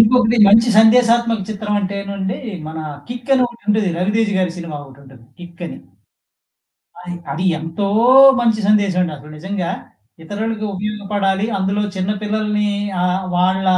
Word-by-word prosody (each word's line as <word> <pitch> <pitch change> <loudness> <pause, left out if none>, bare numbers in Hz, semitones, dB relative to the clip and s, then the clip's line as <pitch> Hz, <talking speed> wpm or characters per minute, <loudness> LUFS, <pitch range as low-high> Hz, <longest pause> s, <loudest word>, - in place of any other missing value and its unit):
ఇంకొకటి 235 +1 +4
మంచి 225 +3 +5
సందేశాత్మక 230 -1 +4
చిత్రం 210 0 -3
అంటేనండి 200 -1 -4 0.3
మన 160 0 -7 0.3
'కిక్' 245 +2 -8
అని 255 - +3
ఒకటుంటది. 215 -3 -1
'రవితేజ' 205 +4 0
గారి 185 -2 0
సినిమా 170 -4 -6
ఒకటుంటది 135 -3 -16
'కిక్' 175 0 -12
అని. - - -8 1.2
అది, 180 0 -7 0.2
అది 160 +6 -3
ఎంతో 165 +5 -4 0.5
మంచి 225 -2 +1
సందేశమండి. 190 -5 +2
అసలు 150 +2 -14
నిజంగా 190 0 -3 0.5
ఇతరులకి 215 +3 -4
ఉపయోగపడాలి. 205 0 -2
అందులో 195 +2 -1
చిన్న 185 +2 -2
పిల్లల్ని 210 0 -1 0.4
ఆహ్, 185 +1 0
వాళ్ళ 185 +2 +1
200 Hz, 125 wpm, -18 LUFS, 180-220 Hz, 1.2 s, మంచి